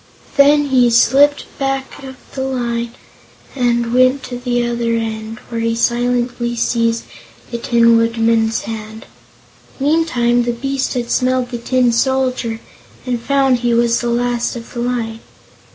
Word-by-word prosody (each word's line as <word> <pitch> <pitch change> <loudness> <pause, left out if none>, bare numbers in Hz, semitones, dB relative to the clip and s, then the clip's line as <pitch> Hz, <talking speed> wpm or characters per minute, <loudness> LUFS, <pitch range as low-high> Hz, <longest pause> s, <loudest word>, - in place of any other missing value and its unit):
Then 290 +1 +5
he 250 -2 +4
slipped 275 +5 +4
back 270 0 -3
of 265 -1 -8 0.2
the 265 - -4
line 240 -3 -3 0.6
and 240 -2 0
went 255 +2 +3
to 245 -1 -6
the 245 -1 -1
other 235 -1 -1
end, 220 0 -4
where 230 -1 -3
he 230 0 0
silently 240 0 0
seized 230 0 0 0.5
the 235 - -3
Tin 235 -1 +4
Woodman's 230 -1 +1
hand. 220 0 -7 0.7
Meantime, 270 -5 +2
the 240 0 -1
beast 270 +2 -2
had 240 -1 -3
smelled 255 -1 0
the 240 - -4
Tin 250 0 +1
Soldier 255 -2 0 0.5
and 245 -2 -2
found 270 -1 +2
he 240 -1 +1
was 235 0 +2
the 240 - -2
last 240 0 -1
of 230 -1 -9
the 240 - -5
line. 235 -2 -2
240 Hz, 145 wpm, -17 LUFS, 230-255 Hz, 0.7 s, Then